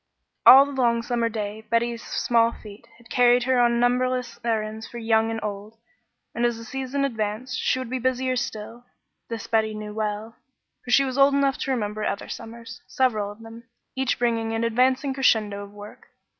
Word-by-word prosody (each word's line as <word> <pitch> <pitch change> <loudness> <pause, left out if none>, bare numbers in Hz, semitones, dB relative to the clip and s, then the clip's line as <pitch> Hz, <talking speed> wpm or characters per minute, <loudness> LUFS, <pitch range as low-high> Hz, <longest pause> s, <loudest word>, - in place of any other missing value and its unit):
All 270 +2 +10
the 285 - -7
long 235 -4 +1
summer 235 -1 0
day 215 -1 -5
Betty's 235 0 0
small 230 -1 +1
feet 210 -1 -13
had 235 -1 -20
carried 245 -1 +4
her 255 0 +2
on 235 -1 +3
numberless 250 0 0
errands 220 -1 -2
for 240 - -10
young 225 -1 +2
and 225 0 -3
old, 210 +1 -6 0.6
and 235 - -2
as 240 -1 +1
the 230 - -9
season 270 +2 -2
advanced 230 +1 -3
she - - +1
would 255 -1 -4
be 260 - -1
busier 255 +1 0
still. 235 0 -5 0.4
This 230 -2 -5
Betty 220 -1 0
well 210 0 -3
knew, - - -24 0.5
for - - -11
she 275 +3 +5
was 260 +1 -3
old 275 0 +5
enough 275 -1 +1
to 270 - -2
remember 215 -4 -2
other 200 -1 -3
summers, 235 +1 -9
several 215 -6 0
of 210 +2 -14
them, 225 +1 -12 0.3
each 265 -1 0
bringing 230 -2 0
an 225 +1 -1
advancing 255 +4 +1
crescendo 215 -6 +1
of 200 - -12
work. 205 +1 -12
235 Hz, 185 wpm, -24 LUFS, 220-255 Hz, 0.6 s, All